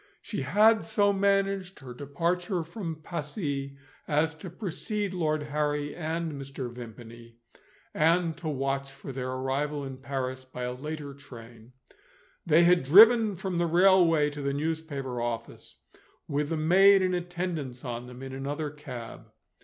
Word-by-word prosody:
She 205 - -5
had 210 +10 +4
so 205 -1 +2
managed 195 -1 +1
her 125 -2 -8
departure 170 - -1
from 165 -2 -6
Passy 145 -4 -4 0.3
as 155 +2 +1
to 160 +4 -9
precede 205 +2 -3
Lord 155 -4 0
Harry 145 0 -2
and 165 0 -3
Mr. 135 -3 -6
Vimpany, 115 0 -11 0.6
and 165 +1 +2
to 165 -1 -6
watch 135 -1 -2
for 135 - -9
their 130 -1 -4
arrival 140 +3 -2
in 135 -1 -7
Paris 130 -1 -4
by 130 -1 -7
a 125 0 -2
later 145 +2 -6
train. 120 -3 -13 0.7
They 165 +1 +6
had 175 0 +5
driven 215 - +7
from 185 -1 -3
the 170 - +2
railway 170 -3 +5
to 145 0 -7
the 140 0 -1
newspaper 145 -4 -3
office 120 -1 -5 0.5
with 145 0 -1
the 165 - -1
maid 190 +5 +6
in 185 0 +1
attendance 175 -8 -4
on 120 0 -5
them 125 +1 -10
in 135 0 -7
another 145 +3 -3
cab. 130 -6 -9
150 Hz, 145 wpm, -28 LUFS, 135-175 Hz, 0.7 s, driven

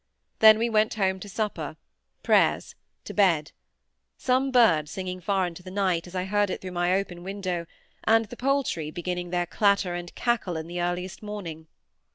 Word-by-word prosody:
Then 220 -1 +9
we 230 +2 +1
went 215 -1 +2
home 190 -2 0
to 205 - -9
supper—prayers—to 180 -7 -2
bed; 170 -7 +3 0.7
some 260 +1 +1
bird 210 - +4
singing 185 +1 -5
far 190 +1 +1
into 175 0 -7
the 185 - -10
night, 185 -3 0
as 175 - -11
I 180 - 0
heard 205 +1 +1
it - - -3
through 185 - -7
my 175 0 0
open 185 -3 -3
window, 185 -3 -4 0.4
and 225 0 +4
the 220 - -10
poultry 260 - 0
beginning 175 +1 -4
their 175 0 0
clatter 200 -1 +2
and 175 0 -6
cackle 230 -8 0
in 160 - -5
the 175 +1 -4
earliest 175 +1 -3
morning. 180 -7 -7
185 Hz, 170 wpm, -26 LUFS, 175-210 Hz, 0.7 s, Then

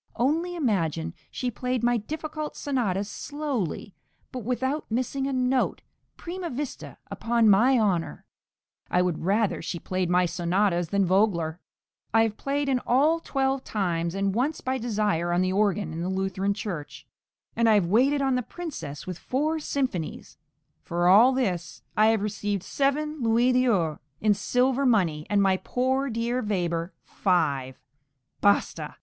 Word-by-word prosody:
Only 325 +8 0
imagine, 165 - -1 0.2
she 250 -1 -3
played 250 +2 -2
my 240 0 +3
difficult 310 +5 -5
sonatas 210 -9 -1
slowly, 265 - -4 0.4
but 255 - -5
without 260 +6 -2
missing 255 +4 -1
a - - -2
note, 255 0 0 0.3
prima 355 0 -5
vista, 275 +1 -6
upon 235 -1 +2
my 245 +7 +5
honour. 195 -7 0 0.6
I 180 - +3
would 175 -4 -2
rather 205 +3 +1
she 175 - -4
played 185 +1 -2
my 180 0 +3
sonatas 175 +1 0
than 200 0 +2
Vogler. 175 -4 +1 0.6
I 225 - +6
have 220 -2 -1
played 280 +3 -2
in 260 -2 +2
all 295 +8 +3
twelve 270 -3 -1
times, 170 -4 -1
and 195 0 0
once 265 +8 0
by 260 0 -2
desire 210 -7 0
on 175 +1 +2
the 185 0 0
organ 200 -3 +1
in 165 - -4
the 180 - -2
Lutheran 190 +1 -1
church, 175 -9 -6 0.5
and 230 -1 +3
I 215 - +6
have 200 -4 +3
waited 265 +10 +3
on 270 -1 +2
the 250 - +1
Princess 220 - -7
with 180 -2 -6
four 305 +5 -1
symphonies; 260 - -3 0.5
for 175 +1 0
all 215 +8 +7
this 185 -10 -2
I 215 +1 +5
have 220 -2 +2
received 205 -2 -2
seven 295 +3 -1
louis 235 +2 +3
d'ors 205 -12 +2 0.2
in 215 -1 +3
silver 250 +6 +1
money, 180 - +2
and 205 -1 +3
my 190 -1 +3
poor 260 +6 0
dear 235 +2 -1
Weber 175 -5 -1
five 140 -9 0 0.6
basta! 200 0 +1
215 Hz, 155 wpm, -26 LUFS, 185-260 Hz, 0.6 s, all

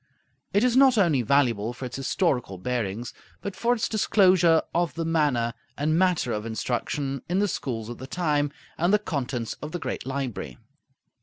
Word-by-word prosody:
It 205 - +3
is 250 -1 +3
not 260 -2 +6
only 165 -10 +3
valuable 120 -3 +2
for 130 - -7
its 125 - -6
historical 135 - 0
bearings, 115 +1 -3 0.3
but 200 -2 -5
for 235 +5 +1
its 225 - -1
disclosure 185 -6 +4
of 170 -2 0
the 165 -1 -2
manner 145 -8 +1 0.2
and 155 +2 +1
matter 180 -8 +2
of 105 - -3
instruction 130 +4 -2
in 180 - +1
the 205 +1 +3
schools 115 - -3
of 120 - -7
the 130 - -7
time, 145 -4 0 0.3
and 175 +3 +3
the 210 - +6
contents 130 - -3
of 150 +1 -6
the 175 - -2
great 130 - -4
library. 130 - -4
145 Hz, 175 wpm, -26 LUFS, 120-175 Hz, 0.3 s, not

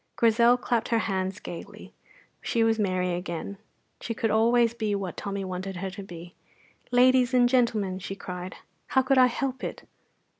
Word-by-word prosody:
Grizel 235 +1 +4
clapped 240 -2 -1
her 230 - +1
hands 190 0 -2
gaily; 170 - -9 0.5
she 230 - +1
was 225 0 +2
merry 185 -3 0
again. 175 +2 -5 0.4
She 230 - -4
could 225 0 0
always 230 +1 +3
be 215 -3 -1
what 195 -3 -4
Tommy 200 -1 -4
wanted 185 +1 -5
her 190 +2 -4
to 195 +2 -8
be. 175 -2 -10 0.6
"Ladies 255 0 +4
and 245 -1 +5
gentlemen," 225 -7 +1
she 195 +1 -6
cried, 180 -1 -7 0.3
"how 265 - +2
could 260 +1 +3
I 255 - +7
help 260 +2 -3
it?" - - -5
215 Hz, 165 wpm, -27 LUFS, 185-240 Hz, 0.6 s, I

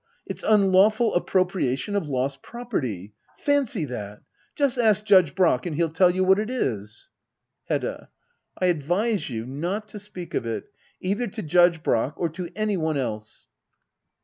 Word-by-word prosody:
It's - - -6
unlawful 210 +2 +4
appropriation 185 -2 0
of 200 -6 -1
lost 135 0 -2
property. 130 - -4 0.2
Fancy 285 - +1
that! 105 -6 -7 0.3
Just 275 -4 +1
ask 215 -3 +4
Judge 185 -8 +5
Brack, 175 -5 +2
and 160 - -3
he'll 165 0 0
tell 180 +2 +4
you 185 +1 +1
what 190 +2 +4
it 215 +2 -2
is. 105 - -3 0.5
Hedda. - - -3 0.5
I 185 - 0
advise 180 +6 0
you 115 -2 -4
not 175 - -3
to 210 - -7
speak 190 -4 -9
of - - 0
it 115 -1 -5 0.2
— - - -36
either 205 +6 -1
to 215 +1 -6
Judge 170 0 +4
Brack, 120 +5 +1
or 170 - 0
to 170 +2 -6
any 215 -2 0
one 160 -3 -1
else. 110 -5 -5
180 Hz, 160 wpm, -25 LUFS, 140-210 Hz, 0.5 s, Judge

